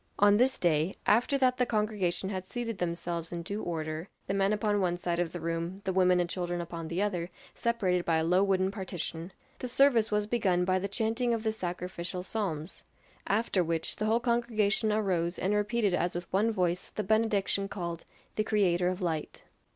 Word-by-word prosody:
On 205 Hz, 0 st, +6 dB
this 260 Hz, +3 st, +3 dB
day, 165 Hz, +1 st, +1 dB
after 240 Hz, +6 st, +3 dB
that 255 Hz, -2 st, +3 dB
the 250 Hz, -, +2 dB
congregation 210 Hz, -4 st, 0 dB
had 185 Hz, -1 st, -4 dB
seated 230 Hz, -3 st, -4 dB
themselves 170 Hz, -1 st, -3 dB
in 170 Hz, -1 st, -4 dB
due 200 Hz, +5 st, -4 dB
order 160 Hz, +1 st, -4 dB, 0.2 s
the 195 Hz, -, -2 dB
men 195 Hz, 0 st, +2 dB
upon 210 Hz, -1 st, +1 dB
one 175 Hz, -1 st, +1 dB
side 175 Hz, -1 st, -2 dB
of 175 Hz, -2 st, 0 dB
the 175 Hz, -, -5 dB
room, 170 Hz, +3 st, -3 dB
the 190 Hz, -, -1 dB
women 180 Hz, -1 st, +4 dB
and 175 Hz, -, +1 dB
children 175 Hz, -1 st, -3 dB
upon 170 Hz, -1 st, -5 dB
the 170 Hz, +5 st, -1 dB
other, 180 Hz, -4 st, -2 dB, 0.2 s
separated 195 Hz, -7 st, 0 dB
by 165 Hz, -2 st, +2 dB
a 160 Hz, -, +1 dB
low 180 Hz, +3 st, +3 dB
wooden 190 Hz, -1 st, +2 dB
partition 180 Hz, -3 st, -4 dB, 0.3 s
the 255 Hz, -, -3 dB
service 245 Hz, -3 st, +4 dB
was 210 Hz, 0 st, +1 dB
begun 195 Hz, -6 st, +1 dB
by 185 Hz, 0 st, +2 dB
the 195 Hz, -, -2 dB
chanting 225 Hz, +4 st, 0 dB
of 220 Hz, -, -5 dB
the 220 Hz, -1 st, +1 dB
sacrificial 180 Hz, -2 st, -4 dB
psalms; 185 Hz, -6 st, -3 dB, 0.4 s
after 200 Hz, -2 st, +2 dB
which 165 Hz, -1 st, -2 dB
the 215 Hz, -, -1 dB
whole 225 Hz, +2 st, +3 dB
congregation 235 Hz, -3 st, +1 dB
arose 185 Hz, -5 st, 0 dB
and 195 Hz, +3 st, 0 dB
repeated 210 Hz, -1 st, +1 dB
as 175 Hz, 0 st, 0 dB
with 175 Hz, 0 st, -3 dB
one 210 Hz, +4 st, +3 dB
voice 180 Hz, -3 st, -1 dB
the 210 Hz, -, -3 dB
benediction 205 Hz, -2 st, +1 dB
called 170 Hz, -4 st, -5 dB, 0.3 s
"The 215 Hz, -, +2 dB
Creator 180 Hz, -5 st, +2 dB
of 185 Hz, +1 st, -2 dB
Light." 160 Hz, -4 st, -3 dB
190 Hz, 195 wpm, -30 LUFS, 175-215 Hz, 0.4 s, On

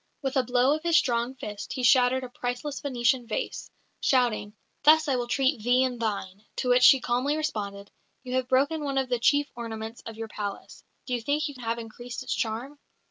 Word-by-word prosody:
With 270 Hz, 0 st, -2 dB
a 265 Hz, -, +4 dB
blow 250 Hz, +2 st, +2 dB
of 310 Hz, -, -6 dB
his 335 Hz, 0 st, +3 dB
strong 240 Hz, -1 st, +1 dB
fist 210 Hz, -5 st, -6 dB
he 255 Hz, -, -4 dB
shattered 255 Hz, +1 st, +4 dB
a 255 Hz, -, -6 dB
priceless 245 Hz, +4 st, -4 dB
Venetian 245 Hz, -2 st, 0 dB
vase, 220 Hz, -, -4 dB, 0.3 s
shouting, 235 Hz, -5 st, +1 dB, 0.3 s
"Thus 310 Hz, +1 st, +6 dB
will 255 Hz, -4 st, 0 dB
I -, -, -16 dB
treat 270 Hz, -2 st, +1 dB
thee 245 Hz, +3 st, +3 dB
and 250 Hz, -2 st, -2 dB
thine" 200 Hz, -3 st, -3 dB
to 250 Hz, -, -2 dB
which 245 Hz, 0 st, +5 dB
she 265 Hz, +1 st, +8 dB
calmly 255 Hz, +5 st, 0 dB
responded, 200 Hz, -10 st, -4 dB, 0.3 s
"You 250 Hz, -1 st, -6 dB
have 255 Hz, -1 st, 0 dB
broken 285 Hz, +5 st, +2 dB
one 275 Hz, -1 st, -2 dB
of 265 Hz, -1 st, 0 dB
the 245 Hz, -1 st, 0 dB
chief 285 Hz, +4 st, +3 dB
ornaments 225 Hz, -1 st, -6 dB
of 225 Hz, -1 st, -8 dB
your 225 Hz, 0 st, -5 dB
palace; 205 Hz, -2 st, -7 dB, 0.2 s
do 250 Hz, -, -4 dB
you 240 Hz, -, -1 dB
think 290 Hz, +6 st, 0 dB
you 290 Hz, -, -7 dB
have 230 Hz, -1 st, -2 dB
increased 235 Hz, +1 st, -7 dB
its -, -, -2 dB
charm?" 245 Hz, +6 st, -3 dB
250 Hz, 205 wpm, -27 LUFS, 230-270 Hz, 0.3 s, she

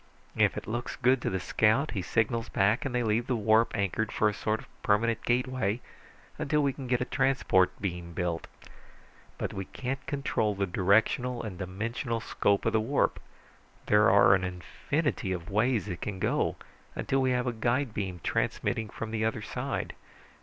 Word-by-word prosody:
If -, -, +3 dB
it -, -, -5 dB
looks 120 Hz, +3 st, -4 dB
good 125 Hz, +1 st, +3 dB
to -, -, -1 dB
the 95 Hz, -, -1 dB
scout, 110 Hz, -, +2 dB
he 100 Hz, -, -2 dB
signals 115 Hz, +4 st, 0 dB
back, 100 Hz, +4 st, +2 dB
and 130 Hz, -2 st, -2 dB
they 120 Hz, -, +1 dB
leave 115 Hz, +2 st, +1 dB
the 125 Hz, -, +1 dB
warp 110 Hz, +1 st, +3 dB
anchored 100 Hz, +2 st, -1 dB
for 110 Hz, -, +2 dB
a 105 Hz, -, +1 dB
sort 110 Hz, +1 st, -1 dB
of -, -, -13 dB
permanent 115 Hz, +2 st, +2 dB
gateway 125 Hz, -3 st, 0 dB, 0.6 s
until 150 Hz, +1 st, +1 dB
we 140 Hz, -1 st, +1 dB
can 130 Hz, -1 st, -7 dB
get 125 Hz, 0 st, +1 dB
a -, -, +1 dB
transport 130 Hz, -10 st, +2 dB
beam 90 Hz, -3 st, -4 dB
built. 85 Hz, -1 st, -2 dB, 0.9 s
But -, -, -3 dB
we 95 Hz, 0 st, -4 dB
can't 135 Hz, +5 st, -4 dB
control 125 Hz, -7 st, 0 dB
the 100 Hz, 0 st, 0 dB
directional 110 Hz, +7 st, +2 dB
and 95 Hz, -5 st, -6 dB
dimensional 115 Hz, +6 st, -3 dB
scope 100 Hz, -2 st, 0 dB
of -, -, +1 dB
the 110 Hz, -, +3 dB
warp. 135 Hz, +6 st, +1 dB, 0.7 s
There 105 Hz, +1 st, +5 dB
are 100 Hz, 0 st, +7 dB
an 95 Hz, -1 st, +2 dB
infinity 95 Hz, -, -2 dB
of 85 Hz, +1 st, -6 dB
ways 110 Hz, +1 st, +1 dB
it 90 Hz, -4 st, -5 dB
can 100 Hz, -2 st, -4 dB
go, -, -, 0 dB, 0.4 s
until 135 Hz, 0 st, 0 dB
we 130 Hz, -, +2 dB
have 125 Hz, 0 st, +1 dB
a 125 Hz, -, -1 dB
guide 120 Hz, +2 st, 0 dB
beam 95 Hz, -5 st, -4 dB
transmitting 110 Hz, -2 st, -1 dB
from 115 Hz, +2 st, -6 dB
the 110 Hz, -1 st, -1 dB
other 110 Hz, -1 st, -1 dB
side. -, -, -3 dB
110 Hz, 180 wpm, -29 LUFS, 100-125 Hz, 0.9 s, are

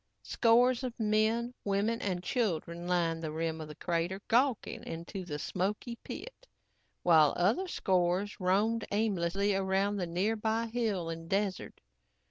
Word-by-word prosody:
Scores 245 Hz, +2 st, +3 dB
of 245 Hz, -2 st, -5 dB
men, 220 Hz, +3 st, +1 dB
women 205 Hz, +3 st, 0 dB
and 180 Hz, -3 st, -2 dB
children 175 Hz, -, -1 dB
lined 170 Hz, -2 st, +1 dB
the 155 Hz, -2 st, -3 dB
rim 160 Hz, 0 st, -2 dB
of 155 Hz, -, -6 dB
the 150 Hz, -, -9 dB
crater, 170 Hz, +4 st, -1 dB
gawking 245 Hz, 0 st, +1 dB
into 170 Hz, +4 st, -6 dB
the 150 Hz, -4 st, -5 dB
smoky 200 Hz, -, -2 dB
pit, -, -, -9 dB, 0.6 s
while 160 Hz, -4 st, +5 dB
other 220 Hz, -, +2 dB
scores 185 Hz, -, 0 dB
roamed 210 Hz, +5 st, +2 dB
aimlessly 200 Hz, -1 st, +1 dB
around 195 Hz, +1 st, +1 dB
the 180 Hz, -3 st, -2 dB
nearby 220 Hz, +6 st, 0 dB
hill 220 Hz, -7 st, -1 dB
and 165 Hz, 0 st, -7 dB
desert. 195 Hz, -1 st, -2 dB
195 Hz, 135 wpm, -31 LUFS, 175-225 Hz, 0.6 s, while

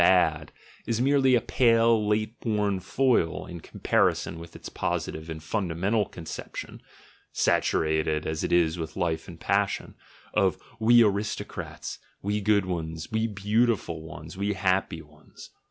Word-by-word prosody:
"bad," 80 Hz, -4 st, +3 dB, 0.4 s
is 115 Hz, 0 st, 0 dB
merely 135 Hz, 0 st, +4 dB
a 120 Hz, -, +3 dB
pale 115 Hz, -2 st, +3 dB
late 110 Hz, +2 st, 0 dB
born 105 Hz, -4 st, 0 dB
foil 105 Hz, -4 st, +1 dB
in 85 Hz, -1 st, -8 dB
comparison 80 Hz, -, 0 dB
with 85 Hz, 0 st, -11 dB
its -, -, -8 dB
positive 80 Hz, +1 st, -3 dB
and 80 Hz, -1 st, -6 dB
fundamental 95 Hz, +3 st, 0 dB
conception 80 Hz, -2 st, -8 dB, 0.5 s
(saturated 80 Hz, -1 st, +1 dB
as 80 Hz, 0 st, -2 dB
it -, -, -1 dB
is 85 Hz, -1 st, +3 dB
with 80 Hz, +1 st, -5 dB
life 85 Hz, -3 st, -1 dB
and -, -, -10 dB
passion), -, -, 0 dB, 0.4 s
of 95 Hz, -2 st, +2 dB, 0.2 s
"we 120 Hz, +1 st, +6 dB
aristocrats, 105 Hz, 0 st, -3 dB, 0.2 s
we 105 Hz, +1 st, 0 dB
good 100 Hz, -1 st, +3 dB
ones, 80 Hz, -3 st, -4 dB
we 110 Hz, +1 st, +1 dB
beautiful 105 Hz, -4 st, 0 dB
ones, 80 Hz, +1 st, -9 dB
we 100 Hz, +2 st, -1 dB
happy 95 Hz, -3 st, 0 dB
ones." 75 Hz, 0 st, -16 dB
95 Hz, 140 wpm, -27 LUFS, 80-110 Hz, 0.5 s, we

